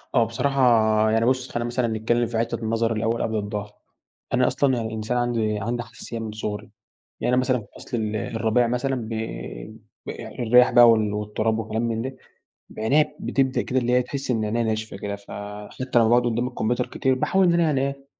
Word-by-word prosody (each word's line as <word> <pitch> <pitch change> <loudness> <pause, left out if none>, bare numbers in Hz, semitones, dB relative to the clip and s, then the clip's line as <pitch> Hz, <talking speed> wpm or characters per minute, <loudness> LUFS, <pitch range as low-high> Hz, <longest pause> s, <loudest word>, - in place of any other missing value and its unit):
آه. 120 - +5
بصراحة 135 +4 0 0.5
يعني 115 +1 +2
بُص، 130 +1 +1
خلّينا 120 0 -2
مثلًا 120 0 0
نتكلّم 115 +2 0
في 115 0 -3
حتّة 115 0 -1
النظر 115 0 0
الأول 115 +1 -1
قبل 110 - -1
الضهر. 105 0 -4 0.6
أنا - - +3
أصلًا 140 -2 +2
يعني 115 -2 -2
الإنسان 110 +2 -2
عندي 115 -3 0
عندي 120 +3 -2
حساسية 115 0 -8
من 110 -1 -5
صغري. 105 -1 -5 0.5
يعني 125 - +1
أنا 125 - +4
مثلًا 130 -1 +1
في 105 - -13
فَصْل 120 - -5
ال 110 -1 -2
الربيع 115 +2 +1
مثلًا 130 +3 -1
ب 115 -3 -5 1.0
ب - - -6 0.3
الرياح 125 +1 +5
بقى 120 -1 +8
وال 110 -2 +3
والتُراب 105 +2 -1
وكلام 110 +1 -2
من 115 -1 -1
ده، 130 +1 -5 0.6
عينيّا 140 +8 +2
بتبدأ 135 -2 0
كده 130 - -1
اللي 125 -1 0
هي 125 - +4
تحِس 135 +2 -5
إن 110 -3 +1
عينيّا 115 +2 0
ناشفة 110 -1 -2
كده، 100 +1 -4
فحتّى 105 +5 -4
لمّا 115 - +4
باقعد 120 +2 +5
قُدّام 120 +1 0
الكمبيوتر 120 0 -1
كتير 130 -1 0
باحاول 190 +8 +2
إن 175 - +4
أنا 170 - +3
يعني 150 -5 +2
إيه، 140 0 -3
115 Hz, 200 wpm, -24 LUFS, 110-125 Hz, 1.0 s, بقى